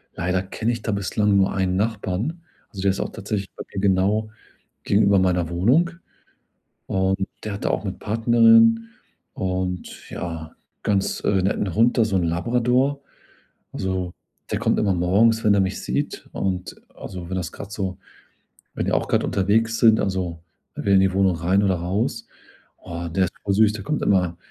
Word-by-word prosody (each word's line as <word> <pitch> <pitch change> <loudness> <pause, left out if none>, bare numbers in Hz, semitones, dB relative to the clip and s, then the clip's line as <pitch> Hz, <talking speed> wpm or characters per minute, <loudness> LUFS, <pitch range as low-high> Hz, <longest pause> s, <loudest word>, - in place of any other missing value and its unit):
leider 90 +2 -1
kenne 110 +4 -2
ich 115 - -5
da 110 - -2
bislang 100 0 +1
nur 95 0 +2
einen 95 -1 0
Nachbarn. 110 - -2 0.3
Also 100 - -7
der 100 0 +3
ist 95 - -4
auch - - -3
tatsächlich 100 -1 -4
bei - - -7
mir - - -3
genau 100 +3 +2 0.6
gegenüber 100 -1 +4
meiner 90 -2 +1
Wohnung. 120 - +2 1.0
Und 95 0 0 0.2
der 110 - -4
hat 100 - -6
da - - +2
auch - - -2
'ne 95 - -1
Partnerin 115 +1 +4 0.4
und 90 -1 -4
ja, 80 -2 -6 0.3
ganz, 100 -2 0
äh, 95 -2 +1
netten 95 -1 -1
Hund, 115 +3 +3
da, 115 - +4
so 100 -3 0
'n 90 - 0
Labrador. 125 +11 +1 0.7
Also, 95 -2 -2 0.4
der - - 0
kommt - - +1
immer 100 -3 +2
morgens, 105 +6 +3
wenn 105 -2 +4
er 100 - +3
mich 95 0 -2
sieht - - -3
und 90 -1 -3 0.2
also 90 -3 -8
wenn 95 - -3
das 85 -2 -4
grad 100 - -9
so 95 -3 -4 0.8
wenn - - -2
wir - - +1
auch - - -3
grad - - +1
unterwegs 110 +4 +1
sind, 110 -2 +5
also 90 -4 -2 0.3
wenn - - -6
wir 100 - +3
in 95 - +6
die 95 0 +2
Wohnung 95 -2 +3
rein 90 +5 +2
oder 95 -2 +2
raus. 90 +6 -2 0.5
Oh, 85 -1 -6
der 95 +3 +1
ist 90 - -8
voll 100 -1 0
süß. 110 +1 +4
Der 105 -3 -7
kommt 150 +7 -2
immer 90 -4 +2
95 Hz, 180 wpm, -23 LUFS, 95-110 Hz, 1.0 s, in